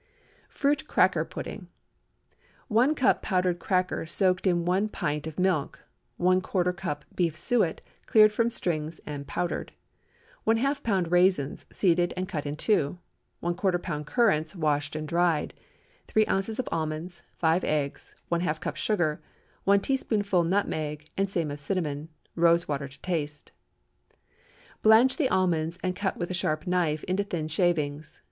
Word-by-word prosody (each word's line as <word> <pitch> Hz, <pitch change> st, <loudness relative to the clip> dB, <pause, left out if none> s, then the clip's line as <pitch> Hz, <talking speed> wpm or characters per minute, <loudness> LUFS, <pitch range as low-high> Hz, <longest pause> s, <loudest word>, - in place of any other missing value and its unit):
FRUIT 285 Hz, +1 st, 0 dB
CRACKER -, -, +3 dB
PUDDING. -, -, -7 dB, 1.0 s
1 250 Hz, +7 st, +3 dB
cup 265 Hz, -2 st, +3 dB
powdered 180 Hz, -2 st, 0 dB
cracker 185 Hz, -2 st, 0 dB
soaked 185 Hz, +2 st, +1 dB
in 175 Hz, -2 st, +2 dB
one 190 Hz, +4 st, +1 dB
pint 150 Hz, -5 st, -2 dB
of 160 Hz, -, -8 dB
milk. 180 Hz, -6 st, 0 dB, 0.4 s
¼ 185 Hz, +1 st, +3 dB
lb. 180 Hz, -5 st, -1 dB
beef 170 Hz, -3 st, 0 dB
suet, 180 Hz, 0 st, +1 dB, 0.3 s
cleared 215 Hz, -1 st, +6 dB
from 230 Hz, +2 st, +2 dB
strings 160 Hz, -7 st, -2 dB
and 140 Hz, -1 st, -6 dB
powdered. 175 Hz, -, -3 dB, 0.7 s
½ 275 Hz, +6 st, +2 dB
lb. 190 Hz, -8 st, 0 dB
raisins, 180 Hz, -5 st, +2 dB
seeded 175 Hz, -2 st, +2 dB
and 185 Hz, 0 st, -2 dB
cut 150 Hz, -4 st, -4 dB
in 145 Hz, -, -3 dB
two. 165 Hz, -2 st, +1 dB, 0.5 s
¼ 175 Hz, 0 st, +1 dB
lb. 175 Hz, -5 st, -1 dB
currants, 160 Hz, -9 st, +2 dB
washed 150 Hz, -3 st, 0 dB
and 155 Hz, 0 st, -4 dB
dried. 170 Hz, -2 st, +1 dB, 0.5 s
3 215 Hz, 0 st, +3 dB
oz. 205 Hz, +4 st, -1 dB
almonds. 165 Hz, +2 st, -3 dB, 0.2 s
5 165 Hz, +2 st, +2 dB
eggs. 145 Hz, -2 st, -2 dB, 0.2 s
½ 170 Hz, -2 st, 0 dB
cup -, -, -4 dB
sugar. 175 Hz, -8 st, 0 dB, 0.4 s
1 200 Hz, 0 st, +5 dB
teaspoonful 205 Hz, -8 st, +1 dB
nutmeg, 155 Hz, -5 st, -1 dB
and 195 Hz, 0 st, 0 dB
same 165 Hz, -6 st, -1 dB
of 145 Hz, -, -6 dB
cinnamon. 150 Hz, -2 st, -2 dB, 0.2 s
Rose 170 Hz, 0 st, +3 dB
water 140 Hz, -1 st, -2 dB
to 140 Hz, +1 st, -16 dB
taste. 150 Hz, -5 st, -3 dB, 1.3 s
Blanch 225 Hz, +4 st, +6 dB
the 290 Hz, -6 st, +2 dB
almonds 170 Hz, -2 st, +1 dB
and 185 Hz, 0 st, -1 dB
cut 195 Hz, 0 st, -2 dB
with 175 Hz, 0 st, -3 dB
a -, -, -1 dB
sharp 155 Hz, -3 st, -1 dB
knife 170 Hz, -4 st, 0 dB
into 185 Hz, +2 st, 0 dB
thin 170 Hz, -6 st, -3 dB
shavings. 155 Hz, -3 st, -1 dB
175 Hz, 140 wpm, -27 LUFS, 155-195 Hz, 1.3 s, cleared